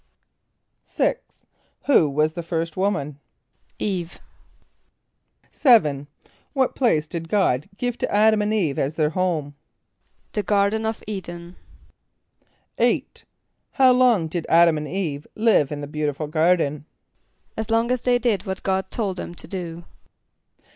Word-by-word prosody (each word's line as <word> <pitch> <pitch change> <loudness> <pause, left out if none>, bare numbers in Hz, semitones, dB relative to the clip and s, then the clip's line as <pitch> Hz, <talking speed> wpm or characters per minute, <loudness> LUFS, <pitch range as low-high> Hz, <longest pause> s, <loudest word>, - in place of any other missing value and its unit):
= - - -52
=6.= - - -2 0.4
Who 170 - +4
was 155 +2 +1
the 170 - -4
first 165 -1 -3
woman? 150 -8 -1 0.6
=[=E]ve.= 180 -5 -3 1.4
=7.= 150 - +3 0.5
What 265 -2 +1
place 195 - +2
did 165 +1 -6
God 160 -10 +1
give 245 -1 -3
to - - 0
[)A]d´[)a]m 215 +1 +3
and 210 +1 0
[=E]ve 175 -11 0
as 140 +3 -2
their 155 -1 +1
home? 160 -5 -1 0.8
=The 210 - -1
garden 205 +2 +1
of 220 - -4
[=E]´d[)e]n.= 175 -3 -7 1.2
=8.= - - 0 0.5
How 260 -2 +5
long 245 -9 +3
did 165 +1 -4
[)A]d´[)a]m 170 -1 +5
and 150 - -5
[=E]ve 155 -6 -4
live 215 -11 +3
in 145 -1 -4
the 145 - -5
beautiful 150 0 -3
garden? 155 -2 +1 0.7
=As 220 0 -4
long 230 +2 +1
as 250 -1 0
they 245 -1 +3
did 225 -5 -1
what 190 0 -4
God 190 0 -1
told 200 -5 -2
them 175 - -6
to 160 - -5
do. 170 -2 -6
180 Hz, 140 wpm, -23 LUFS, 155-215 Hz, 1.4 s, How